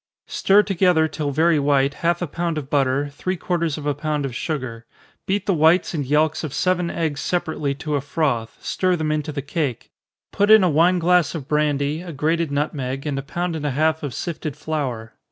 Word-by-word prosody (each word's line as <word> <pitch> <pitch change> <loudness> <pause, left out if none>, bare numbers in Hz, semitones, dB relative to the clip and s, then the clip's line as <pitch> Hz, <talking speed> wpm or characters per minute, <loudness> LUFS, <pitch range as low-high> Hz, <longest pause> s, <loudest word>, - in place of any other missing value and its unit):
_ - - -20
Stir 205 +2 +4
together, 180 -4 +3
till 150 -1 -3
very 160 +3 +3
white, 140 -1 +2
half 170 +1 +1
a - - -2
pound 165 +2 -2
of 140 -2 -6
butter, 140 0 +1
three 185 +6 -3
quarters 170 -4 -1
of 150 - -7
a 145 - +1
pound 150 0 -2
of 130 -3 -5
sugar. 120 -6 -4 0.4
Beat 200 +2 0
the 195 - +2
whites 165 +4 +3
and 150 -4 -1
yelks 150 +4 +1
of 150 -4 -4
seven 180 -2 +1
eggs 160 -4 -2
separately 155 -5 -1
to 150 +1 -4
a 145 - +1
froth, 140 -6 -1
stir 185 -1 0
them 155 -2 -1
into 155 0 -2
the 140 -2 -4
cake 140 -4 -3 0.4
put 205 +1 +1
in 220 -2 +8
a 180 - +4
wine 170 +5 +4
glass 175 -1 +2
of 140 -5 -6
brandy, 150 0 0
a 175 -2 -8
grated 160 +3 0
nutmeg, 140 -2 -2
and 140 -2 -2
a - - -3
pound 175 +4 -3
and 155 - -5
a 140 -1 -3
half 160 +1 +2
of 140 -6 -5
sifted 155 -4 -4
flour. 130 -8 -4
155 Hz, 210 wpm, -22 LUFS, 140-170 Hz, 0.4 s, in